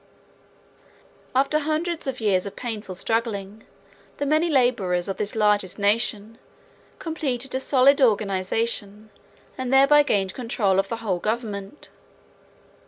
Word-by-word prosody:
After 275 +3 +2
hundreds 315 +2 -2
of 260 -1 -3
years 200 -4 +1
of 200 - -9
painful 215 -6 -6
struggling, 220 0 -3 0.5
the 285 - -2
many 310 +4 +2
laborers 225 - +1
of 195 - -4
this 210 +1 -3
largest 210 -4 +1
nation 210 +1 0 0.6
completed 270 -6 -3
a 260 - 0
solid 275 +1 +4
organization 210 -1 0 0.5
and 255 -1 -3
thereby 275 +2 +6
gained 195 -9 0
control 215 -6 0
of 195 - -1
the 230 - -3
whole 185 -4 0
government. 215 +2 -4
225 Hz, 120 wpm, -24 LUFS, 200-270 Hz, 0.6 s, thereby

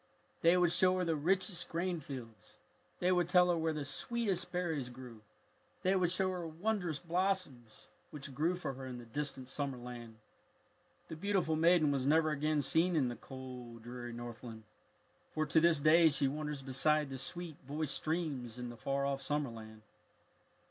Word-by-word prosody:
They 170 +2 +5
would 175 -2 +4
show 185 +1 +5
her 180 - 0
the 165 -1 +1
richest 180 +3 0
grain 175 +1 -1
fields. 120 -8 -9 0.4
They 180 +1 +2
would 175 -2 +2
tell 180 0 +5
her - - +2
where 160 -1 0
the 150 -2 -4
sweetest 195 +3 -1
berries 160 -8 -2
grew. 120 -3 -11 0.6
They 185 +1 +3
would 180 -2 +2
show 185 +1 +2
her 175 -2 -4
wondrous 175 -1 -1
blossoms 175 - -2 0.2
which 140 -2 -7
grew 160 +7 +1
for 175 -6 -4
her 130 0 -8
in 125 -1 -6
the 120 - -10
distant 135 +1 -3
summer 135 -1 -3
land. 120 -2 -9 0.9
The - - -6
beautiful 185 -2 0
maiden 165 -2 +4
was 135 -1 0
never 155 +1 +4
again 150 0 +1
seen 165 +6 +3
in 135 -6 +2
the 120 - -5
cold, 125 -2 -9
dreary 120 0 -7
Northland, 120 -1 -8 0.7
for 155 0 +1
to 155 +2 +4
this 165 -2 +4
day 160 +3 +6
she 140 -1 +2
wanders 150 0 -4
beside 140 +2 +2
the 135 - -4
sweet 170 +2 -5
voiced 150 0 -2
streams 145 -8 -2
in 125 -1 -5
the 120 - -9
far 140 +5 -1
off 140 0 -1
summer 145 -2 -1
land. 110 -1 -11
150 Hz, 175 wpm, -34 LUFS, 130-175 Hz, 0.9 s, day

